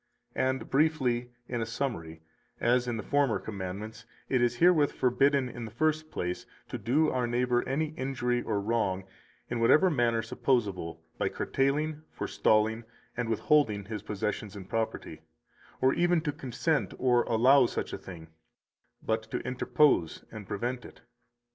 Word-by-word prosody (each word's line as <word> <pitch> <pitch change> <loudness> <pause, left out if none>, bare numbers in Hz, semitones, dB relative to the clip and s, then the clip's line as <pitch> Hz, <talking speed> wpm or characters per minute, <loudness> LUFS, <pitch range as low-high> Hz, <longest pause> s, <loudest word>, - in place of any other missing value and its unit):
And 130 0 -1
briefly, 135 -5 +1 0.2
in 120 -2 -2
a - - 0
summary, 85 - -4 0.4
as 125 +1 +2
in 120 -2 -1
the 110 - -5
former 140 0 +2
commandments, 105 +3 -6 0.2
it 130 -2 +2
is 120 0 +2
herewith 160 0 +4
forbidden, 135 +1 +2
in 120 -1 -7
the - - -7
first 155 +6 0
place, 90 -8 -4 0.2
to - - -4
do 150 +6 +2
our 125 -2 0
neighbor 120 0 +1
any 150 +3 0
injury 125 -4 -1
or 105 -4 -1
wrong 100 -3 0 0.4
(in 120 - -3
whatever 155 +10 +5
manner 120 -5 +1
supposable, 100 - -1 0.2
by - - +1
curtailing, 150 +3 0
forestalling, 110 +2 +1 0.3
and 120 -1 -2
withholding 110 -3 +2
his 105 -1 -5
possessions 105 0 -3
and 95 -2 -9
property), 115 0 -3 0.6
or 130 +1 +4
even 175 0 +3
to 150 -2 -1
consent 140 +4 -1
or 125 -2 +3
allow 125 +3 +5
such - - -4
a - - -2
thing, 80 -4 -10 0.7
but 110 0 0
to - - -2
interpose 125 - +2
and 110 -3 -9
prevent 120 +4 -3
it. - - -13
120 Hz, 150 wpm, -29 LUFS, 110-135 Hz, 0.7 s, whatever